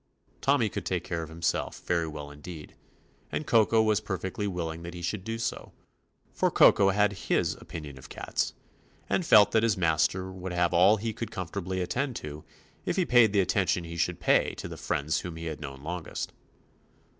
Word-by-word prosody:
Tommy - - +3
could - - -4
take - - -1
care 85 - -3
of 80 - -7
himself 80 +1 -2
very 85 -2 +1
well 75 -2 -7
indeed, 75 +2 -10 0.6
and 155 - -2
Koko 115 -2 +4
was 110 -1 +3
per 95 - -3
67 95 - -4
THE 115 - -6
ADVENTURES 100 - 0
OF - - -4
fectly - - -7
willing 85 -1 -3
that 85 +1 -7
he 85 - -7
should 95 +2 -2
do 115 +2 -3
so, 115 - -4 0.6
for - - +2
Koko 100 -1 +6
had 105 +1 +3
his 100 - 0
opinion 75 -4 -8
of - - -13
cats, - - -2 0.5
and 185 - +1
felt 105 -10 +7
that 110 - +4
his 115 -4 +2
master 90 +2 +1
would 95 -1 -6
have 90 0 +1
all 100 +5 +6
he 110 +1 -3
could 110 0 -5
comfortably 95 -1 -4
attend 125 +8 -1
to 75 -4 -7 0.4
if - - -1
he 185 - +2
paid 120 -6 +5
the 100 -1 +4
attention 95 -1 +1
he 85 0 -7
should 85 +1 -1
pay - - +3
to - - -6
the - - -7
friends 75 +3 -1
whom 90 -2 -6
he 80 0 -7
had 80 -2 -5
known 70 -1 -8
longest. 90 +1 -5
90 Hz, 210 wpm, -28 LUFS, 80-105 Hz, 0.6 s, felt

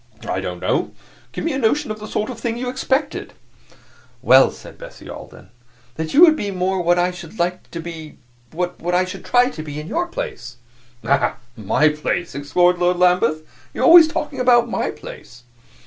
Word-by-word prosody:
"I - - -1
don't - - -5
know. - - -1 0.4
Give - - -6
me 330 - 0
a 265 - -2
notion 275 +3 0
of 215 - -6
the 215 - -8
sort 215 +3 -3
of 235 - -9
thing 230 0 -3
you 250 +1 -3
expected." 265 +3 -2 0.9
"Well," - - +6
said - - -13
Bessie - - -12
Alden, - - -11 0.4
"that 160 +4 -5
you 300 - +4
would 325 -3 +8
be 205 -9 -3
more 185 0 -1
what 175 0 +2
I 175 +1 +1
should 180 +2 -11
like 180 +1 -2
to 170 - -7
be 160 -2 -9 0.3
what 175 +1 -3
I 185 +1 +2
should 185 0 -8
try 250 +1 +3
to 155 - -7
be 150 -1 -7
in 150 - -7
your 345 - -2
place." 435 - -7 0.5
"Ah, 140 0 +1 0.2
my 115 +8 +2
place!" 155 +3 -3
exclaimed 175 +6 +1
Lord 180 0 +2
Lambeth. 180 -3 +2 0.3
"You - - -4
are - - +3
always 335 -1 +9
talking 300 -3 -4
about 240 -2 +4
my - - -2
place!" 470 - -11
185 Hz, 195 wpm, -20 LUFS, 170-255 Hz, 0.9 s, always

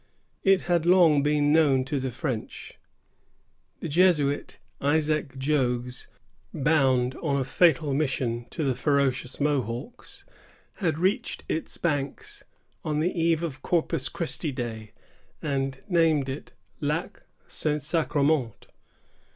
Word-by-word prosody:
It 195 -1 +4
had 170 -2 +1
long 170 -5 +6
been 145 0 +2
known 140 -5 +4
to 145 0 -2
the 130 0 -2
French. 125 -2 -5 1.0
The - - -3
Jesuit 150 -3 +2 0.2
Isaac 150 -1 +1
Jogues, 125 -3 -1 0.4
bound 130 -4 +2
on 145 -4 -1
a - - +1
fatal 155 +1 +3
mission 130 -5 -1
to 160 - -3
the 135 -2 +1
ferocious 135 -1 0
Mohawks, 140 - -3 0.5
had 165 -7 0
reached 195 +8 -1
its 160 - -3
banks 145 -5 -3 0.4
on 150 -1 -1
the 170 +4 +1
eve 165 -1 +1
of 135 -5 -4
Corpus 165 -5 0
Christi 160 -2 -3
Day, 115 -5 -6 0.5
and 135 -2 -2
named 160 -7 +2
it 135 - -7 0.3
Lac - - -2 0.2
St. 150 -2 -2
Sacrement. 145 - 0
145 Hz, 120 wpm, -26 LUFS, 130-160 Hz, 1.0 s, long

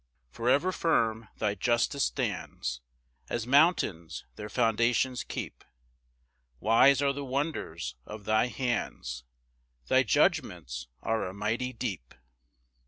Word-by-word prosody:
2 - - -18
For 115 +2 0
ever 160 +8 +3
firm 115 -11 +1
thy 105 -2 0
justice 120 +2 +1
stands, 60 +1 -3 0.5
As 120 -2 -2
mountains 130 - +2
their 105 0 -7
foundations 120 +2 +1
keep; - - -6 1.0
Wise 130 +6 +5
are 140 -1 +2
the 140 +1 -5
wonders 135 - -3
of 105 +4 -9
thy 110 +3 +3
hands; 115 - -3 0.6
Thy - - +5
judgments - - +1 0.2
are 110 -3 0
a 95 - -7
mighty 115 +5 -1
deep. 95 - -5
115 Hz, 115 wpm, -29 LUFS, 100-130 Hz, 1.0 s, Wise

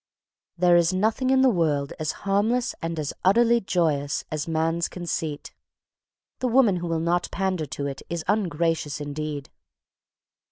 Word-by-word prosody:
There 175 0 +5
is 170 0 +4
nothing 220 +7 +1
in 265 0 +4
the 265 - +6
world 150 -7 0
as 155 0 -1
harmless 215 +5 +1
and 165 0 -3
as 150 -2 -3
utterly 235 +5 +4
joyous 155 -7 0
as 155 0 -3
man's 165 +1 0
conceit. 165 -4 -4 0.9
The 255 - 0
woman 235 -6 +4
who 175 0 -4
will 165 -1 0
not 170 +2 0
pander 185 -4 -1
to 140 +1 -5
it 140 -1 -5
is 170 -2 -3
ungracious 165 -7 0
indeed. 145 -1 -5
170 Hz, 150 wpm, -25 LUFS, 155-195 Hz, 0.9 s, the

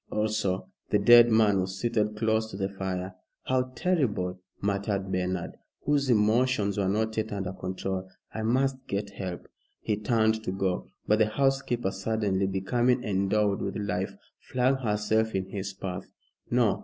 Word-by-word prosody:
Also, 105 -3 -1 0.2
the - - +4
dead 120 +3 +8
man 110 -3 +4
was 95 +1 -2
seated 105 -2 0
close 110 0 +1
to 95 - -7
the 95 -1 -1
fire. 95 -1 -4 0.3
"How 130 0 0
terrible!" 105 - 0 0.2
muttered 100 -1 -1
Bernard, 90 -1 -2 0.3
whose 140 -2 +2
emotions 110 -1 +3
were 100 -2 0
not 110 +2 0
yet 110 0 -1
under 95 -2 -3
control. 95 0 -4 0.2
"I 110 - -3
must 130 +3 0
get 100 +1 -3
help." 90 -3 -6 0.3
He 105 - -1
turned 110 0 +1
to 95 - -2
go, 95 -1 -1 0.2
but 105 +1 +3
the 110 - +4
housekeeper, 125 -3 0
suddenly 100 -1 0
becoming 120 +6 +1
endowed 100 0 +1
with - - -3
life, 100 -1 -2 0.2
flung 130 +1 +1
herself 110 -2 0
in 95 -1 0
his 100 -1 -4
path. 95 -1 -5 0.4
"No!" 120 -4 +2
105 Hz, 155 wpm, -28 LUFS, 95-115 Hz, 0.4 s, dead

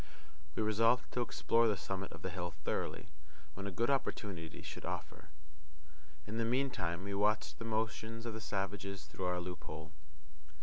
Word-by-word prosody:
We - - +2
resolved 115 +3 +4
to 125 - +1
explore 115 0 +4
the 105 -3 +3
summit 95 +2 -3
of - - -9
the 95 - -1
hill 90 0 -2
thoroughly, 95 - -1 0.4
when 100 +4 -4
a - - -1
good 115 +8 +2
opportunity 95 - -1
should - - -6
offer. - - -4 1.0
In 110 +2 -2
the - - +3
meantime 115 -9 +1
we 100 0 -2
watched 105 +2 +2
the 115 - -4
motions 110 +1 -1
of 115 - -1
the 110 - -4
savages 100 -3 -2
through 85 +4 -4
our 90 0 +2
loophole. 80 -3 -5
100 Hz, 165 wpm, -37 LUFS, 90-115 Hz, 1.0 s, resolved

